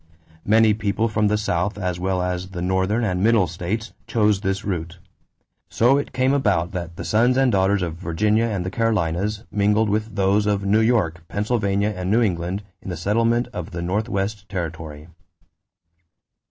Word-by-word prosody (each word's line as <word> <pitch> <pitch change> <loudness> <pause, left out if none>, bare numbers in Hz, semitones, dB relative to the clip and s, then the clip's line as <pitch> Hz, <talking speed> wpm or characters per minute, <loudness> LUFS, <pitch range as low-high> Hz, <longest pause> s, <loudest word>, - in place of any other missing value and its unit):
Many 110 +1 +5
people 105 +1 0
from 105 0 +1
the 105 +1 +2
South 100 -1 -1
as 90 -3 -2
well 90 0 0
as 90 0 -2
the 90 -2 -6
Northern 95 +5 +1
and 90 -4 0
Middle 110 -2 +4
states 90 +7 -4
chose 105 -3 +2
this 95 -1 -2
route; 85 -3 -3 0.7
so 130 +5 +3
it - - -5
came 130 +1 +1
about 100 -10 +1
that 85 -2 -5
the - - -6
sons 120 +4 +3
and 135 -2 +3
daughters 95 -1 +2
of 85 -2 -4
Virginia 105 +6 +1
and 100 -6 -2
the 90 - -3
Carolinas 105 -1 0
mingled 105 +1 +2
with 110 +1 -2
those 100 +1 +2
of 100 -1 0
New 105 +3 +3
York, 95 -8 +1
Pennsylvania, 105 -1 0
and 90 0 -3
New 115 +4 +3
England 90 0 -2 0.2
in - - -8
the 90 - -4
settlement 115 +7 +1
of 90 -4 -5
the 85 - -5
Northwest 100 +1 -2
territory. 80 -4 -5
100 Hz, 170 wpm, -22 LUFS, 90-110 Hz, 0.7 s, Many